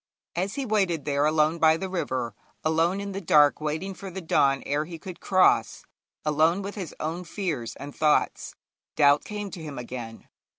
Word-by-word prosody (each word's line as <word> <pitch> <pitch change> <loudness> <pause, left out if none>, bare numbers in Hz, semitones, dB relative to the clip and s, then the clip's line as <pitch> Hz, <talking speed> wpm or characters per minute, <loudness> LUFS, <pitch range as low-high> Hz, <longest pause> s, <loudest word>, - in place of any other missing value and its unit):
As 190 +4 -2
he 275 - -2
waited 190 - 0
there 145 0 +2
alone 155 +1 +2
by 160 0 +5
the 190 - -4
river, 130 - -2 0.3
alone 165 +4 +2
in 200 0 -4
the 195 +1 -4
dark 150 -4 +4
waiting 155 +6 -2
for 195 +1 -8
the 190 +1 -6
dawn 140 -5 +2
ere 145 +2 0
he 170 +1 -8
could 180 +2 -9
cross, 185 -1 +3 0.4
alone 160 +5 +2
with 200 +1 -5
his 185 -6 -6
own 165 +3 -3
fears 165 - -4
and 145 0 -9
thoughts, 150 -1 +1 0.4
doubt 145 0 +5
came 205 -2 -5
to 180 - -8
him 150 -3 -7
again. 120 -2 -7
160 Hz, 180 wpm, -26 LUFS, 145-190 Hz, 0.4 s, by